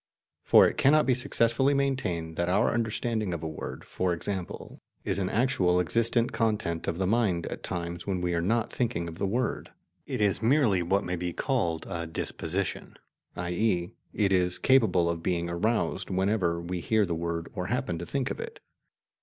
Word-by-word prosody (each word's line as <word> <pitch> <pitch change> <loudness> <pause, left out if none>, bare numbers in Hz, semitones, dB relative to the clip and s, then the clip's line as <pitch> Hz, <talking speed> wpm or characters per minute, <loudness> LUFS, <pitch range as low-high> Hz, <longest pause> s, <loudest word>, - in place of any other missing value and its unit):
For - - +7
it - - -3
cannot 150 +3 +5
be 130 - +3
successfully 125 +2 +2
maintained 90 -13 -1
that 85 +1 -1
our 100 +4 +2
understanding 110 -4 -1
of 80 - -7
a - - -2
word, 80 - -7
for 90 -1 -1
example, 90 +1 -5 0.2
is - - -1
an 95 -1 -1
actual 95 -7 +2
existent 115 +7 +2
content 105 -7 -1
of 80 - -1
the 95 - 0
mind 95 -5 +1
at - - -6
times 85 0 -5
when 95 -2 -1
we 90 0 -1
are 85 - +1
not 115 +6 0
thinking 115 -9 -1
of 85 +1 -8
the 100 - 0
word. 120 +4 -1 0.4
It 130 - -3
is 105 0 +2
merely 115 -6 +3
what 95 +4 +1
may 90 0 -3
be 90 0 -3
called 85 - -1
a 85 -1 -4
"disposition," 85 +3 -3 0.4
i.e. 90 0 0 0.2
it 100 -2 +1
is 90 -1 +2
capable 110 -10 +3
of 85 -1 -2
being 85 -1 -1
aroused 110 +7 -1
whenever 95 -2 +1
we 90 +1 -4
hear 110 +4 +2
the 85 - -2
word 85 0 -3
or 90 -2 -3
happen 110 -7 -2
to 85 - -5
think 135 -2 -1
of - - -5
it. 465 +1 -7
95 Hz, 185 wpm, -28 LUFS, 85-115 Hz, 0.4 s, For